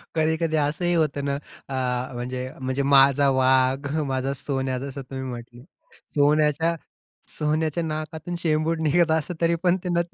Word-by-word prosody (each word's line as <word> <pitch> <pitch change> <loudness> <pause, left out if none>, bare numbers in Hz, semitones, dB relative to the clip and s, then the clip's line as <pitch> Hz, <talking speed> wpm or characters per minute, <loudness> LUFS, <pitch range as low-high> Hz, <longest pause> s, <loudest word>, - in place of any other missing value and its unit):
कधी-कधी 160 0 +1
असंही 155 +4 0
होतं 145 -3 0
ना, 140 0 0 0.3
अ, 125 -1 -2
म्हणजे 125 +1 -4
म्हणजे 130 +2 -1
माझा 140 0 +5
वाघ, 130 +1 +3 0.2
माझा 135 +1 -1
सोन्या 130 -1 -2
जसं 140 +1 -6
तुम्ही 130 0 -7
म्हटले. 120 0 -9 0.5
सोन्याच्या, 150 +3 +3 0.6
सोन्याच्या 155 +2 0
नाकातून 160 +2 -4
शेंबूड 160 0 0
निघत 165 +2 +3
असतं, 160 +2 0
तरी 170 0 +3
पण 180 +1 +3
ते 180 - -3
न 170 0 +2
145 Hz, 140 wpm, -24 LUFS, 130-160 Hz, 0.6 s, माझा